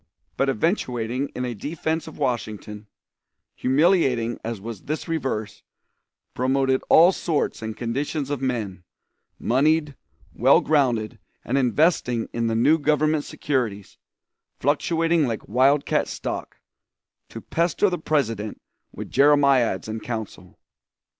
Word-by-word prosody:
"] - - -46
but 135 - +1
eventuating 125 - -1
in 125 - -2
a 125 - -3
defense 160 +7 -3
of 160 - -10
Washington, 110 -5 -3 0.7
humiliating 130 -5 +2
as 115 -2 -4
was 110 -1 -8
this 155 +4 -4
reverse, 130 -10 -3 0.7
promoted 130 +1 +1
all 170 +3 +7
sorts 165 -9 -2
and 110 -1 -5
conditions 140 +4 -3
of 145 -3 -2
men, 110 -9 -3 0.5
moneyed, 150 +3 +1 0.4
well - - +5
grounded, 125 -8 +1 0.3
and 120 - -1
investing 125 -2 +2
in 115 -1 -1
the 115 - 0
new 150 +8 +4
government 150 0 +1
securities, 115 -9 -3 0.6
fluctuating 165 +2 +1
like 115 -2 -4
wildcat 140 +3 +2
stock, - - -5 0.7
to - - -8
pester 170 +4 0
the 180 -2 -2
President 115 -10 -1 0.3
with - - -8
Jeremiads 140 -8 +3
and 110 0 -5
counsel. 110 -6 -7
130 Hz, 120 wpm, -23 LUFS, 115-150 Hz, 0.7 s, all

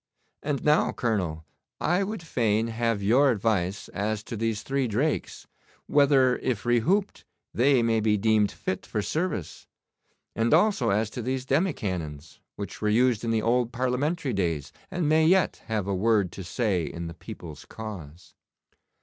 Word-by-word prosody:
And 145 -2 -2
now, 150 +1 +3
Colonel, 90 -9 -2 0.3
I 175 +5 +1
would 210 -2 -5
fain 115 -6 0
have 115 -2 -1
your 130 +8 +4
advice 100 -4 0
as 105 +3 -2
to 115 - -6
these 115 -1 -2
three 135 -1 0
drakes, 135 +8 -2 0.4
whether 135 -3 +4
if 120 -6 -2
rehooped 170 - +1 0.3
they 130 0 +3
may 115 -1 +2
be 105 -1 +2
deemed 105 0 +2
fit 95 - -4
for 105 - -2
service; 155 - -3 0.7
and 115 +5 +3
also 175 - +3
as 105 +2 +1
to 125 - -5
these 130 +2 -2
demi 155 +7 +2
cannons, 80 - -5 0.2
which 100 -2 -7
were 105 - +1
used 120 0 +3
in 115 - -1
the 115 -1 +1
old 120 0 +1
Parliamentary 130 +4 -1
days, 85 -7 -2 0.2
and 175 -4 -1
may 155 +1 +4
yet 180 +2 +3
have 110 -4 -1
a 100 - -1
word 100 -1 +2
to 95 - -8
say 95 -1 0
in 85 +2 -5
the 85 - -6
people's 80 -2 -10
cause. 90 -7 -9
115 Hz, 160 wpm, -26 LUFS, 100-135 Hz, 0.7 s, your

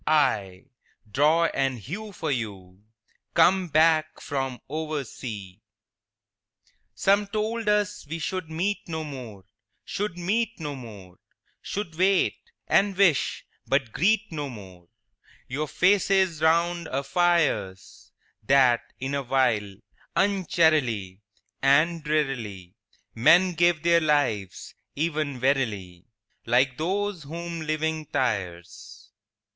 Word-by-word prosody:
—aye, 100 -12 +1 0.5
draw 155 +8 +3
and 135 -2 0
hew 195 - -7
for 160 -5 -3
you, 100 -7 -5 0.5
Come 185 0 +4
back 155 0 +3
from 135 -3 -3
oversea." 130 -10 -5
III - - -52 1.3
Some 200 - +2
told 220 +2 -2
us 210 -4 0
we 165 - -3
should 185 0 -4
meet 185 +6 -1
no 160 -2 -4
more, 125 -9 -8 0.4
Should 200 -3 -3
meet 220 +6 -1
no 150 -2 -4
more; 105 -8 -11 0.4
Should 200 -5 -5
wait, 190 +1 +3 0.3
and 195 -1 +2
wish, 185 -8 +2 0.2
but 135 -4 +1
greet 215 - +1
no 145 -3 -4
more 95 -7 -12 0.6
Your 145 +4 -3
faces 190 -1 +2
round 170 +1 +2
our 135 +1 -2
fires; 165 - 0 0.3
That, 130 0 +4 0.2
in 135 +2 -3
a 140 - 0
while, 120 -7 +1 0.4
uncharily 155 - +1 0.4
And 155 +4 +3
drearily 125 -12 -2 0.4
Men 175 +11 +5
gave 170 -2 +2
their 170 0 +4
lives—even 145 - -2
wearily, 110 -10 -1 0.4
Like 125 +2 +2
those 195 +2 -1
whom 165 +3 -6
living 155 0 -2
tires. 100 -6 -4
150 Hz, 110 wpm, -26 LUFS, 120-175 Hz, 1.3 s, Men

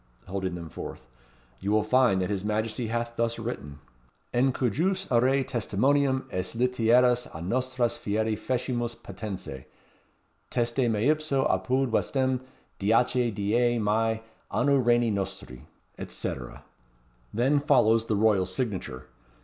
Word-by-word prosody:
holding 95 -1 -3
them 85 -1 -7
forth. - - -8 0.5
"You 100 - -3
will 105 0 +3
find 110 -4 +3
that 90 - -2
his 100 -2 -2
Majesty 110 +2 -1
hath 115 +1 -3
thus 115 0 0
written; 115 - -5 0.6
'_In 130 +2 +3
cujus 165 - 0
rei 130 +3 +3
testimonium 130 +4 +1
has 90 +4 -3
Literas 125 0 +3 0.2
nostras 125 +4 -1
fieri 110 +1 0
fecimus 120 0 -2
patentes. 100 - -7 0.8
Teste 120 +1 +1
Meipso, 140 +5 +1
apud 125 +8 +1
Westm. 130 +2 +1 0.4
10 120 +3 +2
die 120 +4 +2
Maij, 110 +1 +1 0.3
Anno 140 +4 +3
Regni 120 -3 +3
nostri_,' 95 -10 -4 0.5
&c. - - -3 1.0
Then 130 +6 +2
follows 115 -6 +3
the 110 - +1
royal 100 -3 +3
signature. 95 - -3
115 Hz, 115 wpm, -27 LUFS, 105-125 Hz, 1.0 s, will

